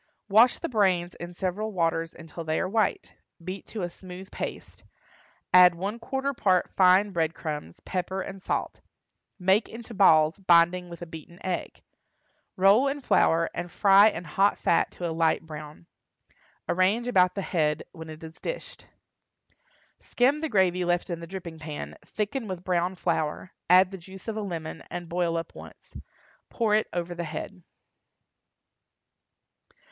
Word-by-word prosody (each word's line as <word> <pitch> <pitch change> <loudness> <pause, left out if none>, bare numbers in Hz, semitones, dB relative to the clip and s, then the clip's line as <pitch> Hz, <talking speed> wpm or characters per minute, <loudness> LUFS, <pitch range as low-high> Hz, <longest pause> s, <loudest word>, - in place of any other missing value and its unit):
Wash 225 +5 +6
the - - -4
brains 185 -6 +1
in 175 +1 -9
several 195 +4 -2
waters 165 -3 0
until 165 0 -9
they 155 0 -1
are 190 - -1
white; 220 +3 0 0.3
beat 185 +3 -7
to 215 -5 -5
a 175 - -2
smooth 185 +1 -11
paste, - - -7 0.7
add 180 -1 +8
one 200 +6 -4
quarter 270 +4 -2
part 185 -7 +1
fine 190 +2 +4
bread 165 -3 -1
crumbs, 150 - -6
pepper, 185 +1 -3
and 195 0 -6
salt; - - -3 0.6
make 190 +3 +2
into 230 +1 -9
balls, 160 -4 +5
binding 175 0 +4
with 170 0 -8
a - - -6
beaten 160 +1 -11
egg; 185 -2 -4 0.7
roll 200 +8 +5
in 280 +1 -2
flour 165 -10 +3
and 175 - -5
fry 200 +1 +6
in 175 -4 -6
hot 195 +5 +2
fat 165 - +2
to 175 - -5
a 165 - -3
light 165 0 +1
brown. 155 +1 -10 0.8
Arrange 195 +7 +2
about 185 -7 +3
the 195 - -3
head 155 -4 0
when 160 -2 -10
it 155 +1 -10
is 160 0 -9
dished. - - -7 1.1
Skim 275 +5 +1
the 320 - -2
gravy 185 -4 +2
left 175 +1 0
in 170 - -3
the 170 - -8
dripping 170 -3 -8
pan, 150 -1 -7
thicken 215 +3 -3
with 185 -2 -6
brown 180 0 0
flour, 170 -1 -2 0.2
add 185 +1 +6
the 195 - -7
juice 190 +4 -13
of 225 - -3
a 215 - -3
lemon, 165 -6 -5
and 175 -1 -6
boil 170 0 0
up 165 0 -5
once. - - -14 0.5
Pour 225 -3 0
it 215 0 +3
over 175 0 -3
the 170 0 -4
head. 170 +4 -6
180 Hz, 160 wpm, -27 LUFS, 170-200 Hz, 1.1 s, add